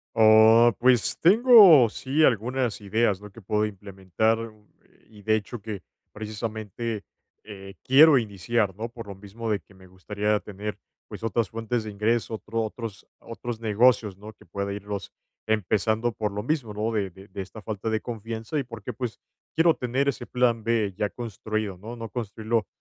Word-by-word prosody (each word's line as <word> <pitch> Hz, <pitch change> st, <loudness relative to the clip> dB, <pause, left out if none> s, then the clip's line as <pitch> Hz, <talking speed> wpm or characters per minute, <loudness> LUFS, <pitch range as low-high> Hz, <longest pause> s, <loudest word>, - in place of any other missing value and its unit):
Oh, 110 Hz, +2 st, +7 dB
pues 125 Hz, -1 st, +3 dB
tengo 200 Hz, -, +8 dB
sí 135 Hz, +7 st, 0 dB
algunas 120 Hz, 0 st, 0 dB
ideas, 105 Hz, -1 st, 0 dB
¿no?, 105 Hz, -1 st, -11 dB
que 115 Hz, -, -13 dB
puedo 105 Hz, +2 st, 0 dB
implementar, 100 Hz, +2 st, -1 dB, 0.5 s
eh, -, -, -29 dB
y 105 Hz, -2 st, -16 dB
de 110 Hz, +1 st, +3 dB
hecho 110 Hz, +2 st, -5 dB
que 105 Hz, -3 st, -6 dB, 0.3 s
precisamente, 110 Hz, 0 st, -5 dB, 0.4 s
eh, 95 Hz, -2 st, -10 dB
quiero 145 Hz, +3 st, +7 dB
iniciar, 105 Hz, -2 st, -1 dB
¿no? 115 Hz, +3 st, -5 dB
Por 115 Hz, -2 st, -10 dB
lo 100 Hz, -, -7 dB
mismo 105 Hz, +4 st, -7 dB
de 105 Hz, -2 st, 0 dB
que -, -, -22 dB
me 95 Hz, -1 st, -17 dB
gustaría 105 Hz, +3 st, -1 dB
tener, 105 Hz, +1 st, -6 dB, 0.3 s
pues, -, -, -10 dB
otras 115 Hz, -2 st, 0 dB
fuentes 115 Hz, 0 st, -3 dB
de 105 Hz, -, -5 dB
ingreso, 110 Hz, +3 st, 0 dB
otro 110 Hz, +1 st, -3 dB
otros 110 Hz, -2 st, -6 dB
otros 115 Hz, 0 st, -7 dB
negocios, 110 Hz, -2 st, +3 dB
¿no? 105 Hz, +2 st, -11 dB
Que -, -, -21 dB
pueda 100 Hz, +3 st, -4 dB
irlos 100 Hz, -1 st, -6 dB, 0.3 s
empezando, 110 Hz, +2 st, +1 dB
por 105 Hz, -2 st, -3 dB
lo 105 Hz, +1 st, -4 dB
mismo, 130 Hz, -6 st, -2 dB
¿no? 105 Hz, +2 st, -2 dB
De 105 Hz, -4 st, -1 dB
de 95 Hz, +3 st, -16 dB
de 95 Hz, -, -6 dB
esta 95 Hz, +4 st, -10 dB
falta 110 Hz, 0 st, -4 dB
de 110 Hz, -1 st, -1 dB
confianza, 115 Hz, +4 st, -5 dB
y -, -, -1 dB
porque, 115 Hz, -4 st, -7 dB
pues, 120 Hz, -3 st, -5 dB, 0.4 s
quiero 165 Hz, 0 st, +4 dB
tener 130 Hz, +3 st, 0 dB
ese 120 Hz, -, -4 dB
plan 120 Hz, -3 st, +1 dB
B 110 Hz, -4 st, +1 dB
ya 105 Hz, -1 st, 0 dB
construido, 110 Hz, -3 st, -4 dB
¿no? 110 Hz, +6 st, -8 dB
No 115 Hz, -1 st, -7 dB
construirlo 110 Hz, -1 st, -2 dB
110 Hz, 175 wpm, -25 LUFS, 105-115 Hz, 0.5 s, tengo